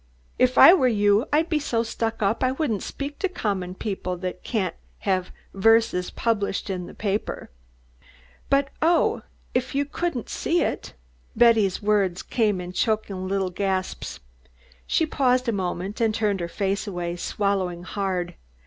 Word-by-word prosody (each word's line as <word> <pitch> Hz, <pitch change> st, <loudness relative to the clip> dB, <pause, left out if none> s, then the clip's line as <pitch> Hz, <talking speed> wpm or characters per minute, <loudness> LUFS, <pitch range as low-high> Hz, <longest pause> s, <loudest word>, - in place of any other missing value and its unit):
If 255 Hz, 0 st, +3 dB
I 345 Hz, -, +10 dB
were 270 Hz, -9 st, +4 dB
you 205 Hz, +1 st, +3 dB
I'd 310 Hz, +3 st, +3 dB
be 315 Hz, -3 st, +1 dB
so 235 Hz, -6 st, 0 dB
stuck 225 Hz, -1 st, -3 dB
up 200 Hz, +5 st, +1 dB
I 255 Hz, 0 st, +2 dB
wouldn't 255 Hz, -8 st, -1 dB
speak 285 Hz, +1 st, -6 dB
to 385 Hz, -, 0 dB
common 195 Hz, -, -3 dB
people 190 Hz, -3 st, -3 dB
that 180 Hz, 0 st, -5 dB
can't 195 Hz, -8 st, -1 dB, 0.3 s
have 185 Hz, -2 st, 0 dB, 0.2 s
verses 220 Hz, -2 st, +3 dB
published 205 Hz, -3 st, -1 dB
in 180 Hz, -2 st, -4 dB
the -, -, -11 dB
papah." 205 Hz, 0 st, -3 dB, 1.0 s
"But 275 Hz, 0 st, +3 dB
oh 335 Hz, +2 st, +3 dB, 0.3 s
if 255 Hz, +2 st, -1 dB
you 285 Hz, +1 st, +2 dB
couldn't 290 Hz, -4 st, -3 dB
see 345 Hz, +2 st, 0 dB
it!" -, -, -4 dB, 0.4 s
Betty's 220 Hz, -5 st, +4 dB
words 200 Hz, -4 st, +1 dB
came 210 Hz, -5 st, +1 dB
in 180 Hz, 0 st, -6 dB
choking 200 Hz, -3 st, -1 dB
little 190 Hz, -1 st, -1 dB
gasps. 190 Hz, 0 st, -2 dB, 0.7 s
She 325 Hz, -, +2 dB
paused 255 Hz, -4 st, +1 dB
a -, -, +3 dB
moment 190 Hz, +1 st, -3 dB
and 220 Hz, -2 st, +2 dB
turned 210 Hz, -3 st, 0 dB
her 170 Hz, -, -2 dB
face 195 Hz, +3 st, -2 dB
away, 175 Hz, -3 st, -3 dB
swallowing 185 Hz, -2 st, -1 dB
hard. 185 Hz, -2 st, -2 dB
205 Hz, 155 wpm, -24 LUFS, 185-245 Hz, 1.0 s, I